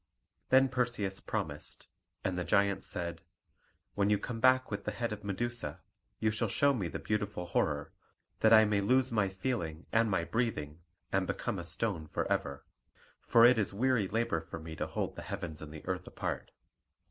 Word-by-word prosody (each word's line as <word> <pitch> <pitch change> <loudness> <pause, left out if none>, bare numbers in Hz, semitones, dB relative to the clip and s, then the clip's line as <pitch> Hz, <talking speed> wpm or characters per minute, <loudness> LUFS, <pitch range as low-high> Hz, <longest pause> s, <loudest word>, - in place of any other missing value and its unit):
Then 135 +1 +6
Perseus 120 -7 -1
promised; - - -4 0.4
and 95 - 0
the 90 - -1
giant 100 +1 +2
said, 85 -2 -4 0.7
"When 100 0 +2
you 105 - +4
come 115 +2 -5
back 130 0 +4
with 105 - -3
the - - -2
head 115 -2 -2
of 105 - -8
Medusa, 100 -5 -3 0.4
you 110 - +1
shall 110 +2 0
show 140 +7 +3
me 100 -9 -1
the - - -4
beautiful 105 -4 -2
horror, 85 - 0 0.5
that 110 - +5
I 110 -1 +9
may 105 -1 +2
lose 130 +5 +3
my 105 -4 +2
feeling 95 -6 -3
and 115 0 +3
my 95 -4 +1
breathing, 85 -9 -2 0.3
and 95 -1 +1
become 95 - -2
a - - -5
stone 85 -1 -2
for - - -2
ever; 70 0 -1 0.6
for 115 0 +7
it 120 -1 +6
is 100 -2 0
weary 120 -2 +2
labour 110 -6 0
for - - -8
me 80 0 -8
to - - -2
hold - - -3
the - - -6
heavens 85 -6 -5
and 75 -1 -8
the 75 -1 -10
earth - - -3
apart." - - -4
105 Hz, 185 wpm, -32 LUFS, 90-115 Hz, 0.7 s, I